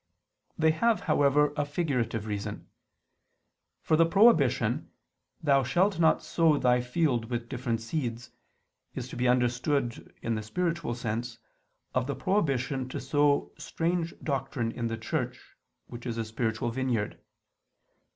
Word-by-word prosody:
They 160 0 +4
have, 225 +8 +2
however, 145 +1 +3
a 145 - +1
figurative 130 -8 -1
reason. 105 -2 -5 1.2
For 155 - +3
the 165 +1 +5
prohibition: 215 +7 +3 0.5
"Thou 140 -2 +4
shalt 180 +9 +1
not 160 -1 +4
sow 165 -3 +3
thy 125 -2 +3
field 125 -2 0
with 120 -1 -3
different 120 -3 -2
seeds," 120 -1 -4 0.6
is - - -4
to - - -8
be 125 +1 +1
understood, 125 +1 0
in 115 - 0
the 110 - -2
spiritual 165 +3 -2
sense, 115 0 -3 0.6
of 125 0 0
the 140 - -2
prohibition 135 - 0
to - - -4
sow 145 -1 +2
strange 170 0 -2
doctrine 135 -4 -2
in 120 0 -3
the 115 0 -3
Church, 125 +1 -3 0.5
which 120 +1 -9
is 115 -1 -3
a 115 - -1
spiritual 110 0 -2
vineyard. 120 -4 -1
130 Hz, 135 wpm, -29 LUFS, 120-155 Hz, 1.2 s, the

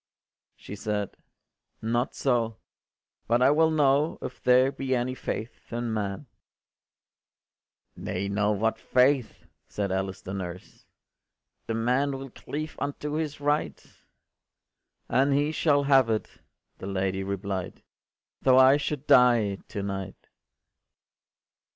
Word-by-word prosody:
” - - -60
She 100 - -9
said, 105 -1 -3 0.6
“Not 120 +3 -1
so: 115 -4 0 0.7
but 120 +2 +3
I 135 - +6
will 160 +2 +4
know 150 0 +2
If 125 - -7
there 125 +2 +4
be 135 -1 -2
any 125 +1 -1
faith 115 -2 -6
in 120 -1 -2
man”. 100 +4 -3 1.7
“Nay 95 +2 -3
now, 105 +1 +1
what 110 +2 0
faith?” 130 0 +1 0.2
said 100 -2 -3
Alice 95 0 -3
the 95 - -6
nurse, 90 -2 -8 0.8
“The 115 - -1
man 130 +5 +1
will 135 -1 -9
cleave 155 +5 -6
unto 145 +1 -3
his 155 -2 -3
right.” 145 - -1 1.2
“And 135 +2 +2
he 145 +2 +1
shall 145 -3 +2
have 135 -4 +4
it,” 110 -1 0 0.5
the 95 - -6
lady 95 0 -1
replied, 100 -1 -4 0.6
“Tho’ 130 -1 +5
I 130 +2 +7
should 145 -1 -3
die 120 -7 +5
to 100 -3 -5
night. 95 -1 -6
120 Hz, 125 wpm, -27 LUFS, 100-140 Hz, 1.7 s, I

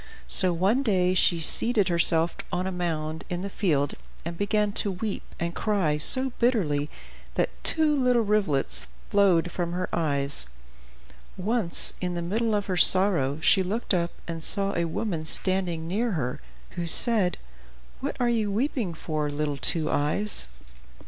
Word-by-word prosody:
So 185 -1 +4
one 190 +9 +1
day 185 -7 +1
she 175 -2 +2
seated 210 +5 +4
herself 170 -1 +3 0.2
on 180 - -2
a 190 - -3
mound 160 -3 -4
in 180 +1 -4
the 200 - -6
field, 145 -9 -1 0.3
and 170 0 -5
began 210 +2 -1
to 200 - +1
weep 195 +2 -4 0.2
and 170 0 -3
cry 190 -9 -1
so 260 - +4
bitterly 165 - 0 0.5
that - - -1
two 310 -2 +3
little 250 -4 +1
rivulets 195 - 0 0.2
flowed 180 -4 +2
from 175 -1 -4
her 180 +1 -3
eyes. 140 - -1 0.9
Once, 205 -2 +3
in 180 -1 -3
the 170 - -4
midst 215 +7 -2
of 205 -1 -1
her 185 -2 -3
sorrow 175 -7 +5
she 195 +4 +4
looked 205 +5 -2
up, 170 -2 0 0.2
and 165 -1 -6
saw 195 +2 +1
a 170 - -1
woman 165 0 -4
standing 175 0 -1
near 220 +5 -2
her 125 - -4 0.3
who 175 -1 -5
said, 200 -1 +4 0.6
"What - - -5
are 245 - +1
you 225 -4 -1
weeping 225 - -2
for, 155 -2 -4
little 145 0 -3
Two 155 +3 +2
Eyes?" 150 - -1
180 Hz, 155 wpm, -25 LUFS, 160-210 Hz, 0.9 s, sorrow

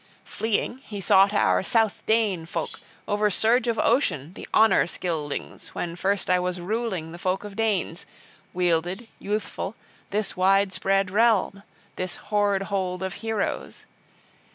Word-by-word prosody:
Fleeing, 225 +3 -1
he 210 -6 -8
sought 195 +1 +5
our 95 - +3
South 225 -3 +1
Dane 210 -7 +1
folk, - - -4 0.3
over 210 0 +2
surge 230 +5 +3
of 230 -1 +1
ocean 175 - +1
the - - -9
Honor 220 -6 +5
Scyldings, 160 -5 -4
when 170 -1 -3
first 195 +2 0
I 180 0 +3
was 180 0 -2
ruling 190 -4 -2
the 170 - -9
folk 185 +2 -1
of 205 -1 -8
Danes, 200 -5 -1 0.4
wielded, 180 +4 0
youthful, 205 0 -3 0.3
this 205 -1 -1
widespread 195 0 +2
realm, 210 -2 +3 0.4
this 185 -1 -3
hoard 205 -2 0
hold 190 -2 -2
of 190 0 -3
heroes. 225 -2 -3
195 Hz, 135 wpm, -25 LUFS, 180-215 Hz, 0.4 s, sought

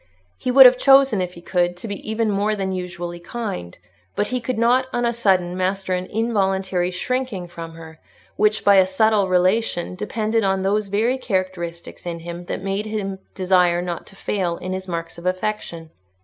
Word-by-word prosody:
He 250 - -4
would 265 +1 +9
have 250 0 +7
chosen, 270 -7 +5
if 180 0 -3
he 170 - -11
could, 175 -1 0
to 200 - -7
be 200 -1 -4
even 220 0 0
more 205 +2 +1
than 195 -2 -2
usually 175 -2 -5
kind; 170 - -6 0.4
but 205 - +1
he 250 -1 -2
could 250 +1 -3
not, 245 +3 +3
on 240 0 0
a 235 - +1
sudden, 185 -6 +1
master 185 0 -1
an 180 0 -2
involuntary 190 -5 0
shrinking 210 0 -3
from 165 -1 -8
her, 160 -1 -12 0.4
which, 210 0 +1
by 200 -1 +7
a 190 -1 +6
subtle 205 0 +2
relation, 185 0 +1
depended 215 +3 -1
on 190 -1 +1
those 205 +2 +1
very 225 +6 +1
characteristics 185 -6 -4
in 170 -1 -4
him 175 +1 -7
that 185 - -5
made 195 +2 -2
him 195 -3 -3 0.2
desire 180 -2 +3
not 175 -1 -4
to - - -15
fail 185 -4 -2
in 185 +1 -5
his 185 0 -5
marks 165 -1 -5
of 175 - -5
affection. 185 -4 -3
190 Hz, 190 wpm, -22 LUFS, 175-215 Hz, 0.4 s, would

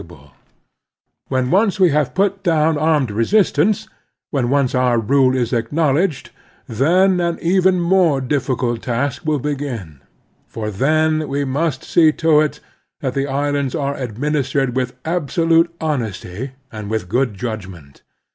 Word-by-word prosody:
The - - -16
Strenuous 75 -5 -15
Life - - -30
ai - - -33 0.9
When 130 -1 -1
once 200 +1 +2
we 185 -2 +5
have 150 -2 0
put 195 +1 +1
down 160 -3 +2
armed 150 -5 +1
resistance, 180 - +1 0.4
when 130 -5 0
once 140 -2 +1
our 125 -2 +2
rule 130 +3 +2
is 125 -1 -1
acknowledged, 145 +6 0 0.4
then 180 - +2
an 170 -1 -1
even 185 +1 +2
more 170 -4 +3
difficult 130 -3 -1
task 125 +4 -2
will 155 -1 +2
begin, 125 - -5 0.5
for 105 -1 -5
then 155 +7 +1
we 140 +1 -2
must 140 0 -1
see 160 -2 +4
to 160 -2 +3
it 150 -1 -2 0.4
that 130 -4 -2
the 140 +1 -1
islands 140 -1 -1
are 140 -1 -2
administered 135 +1 -2
with 125 -1 -2
abso 165 0 -1
lute 165 +1 +3
honesty 125 - -4 0.2
and 105 -2 -7
with 110 -4 -2
good 120 +2 0
judgment. 95 - -7
140 Hz, 150 wpm, -19 LUFS, 125-160 Hz, 0.9 s, we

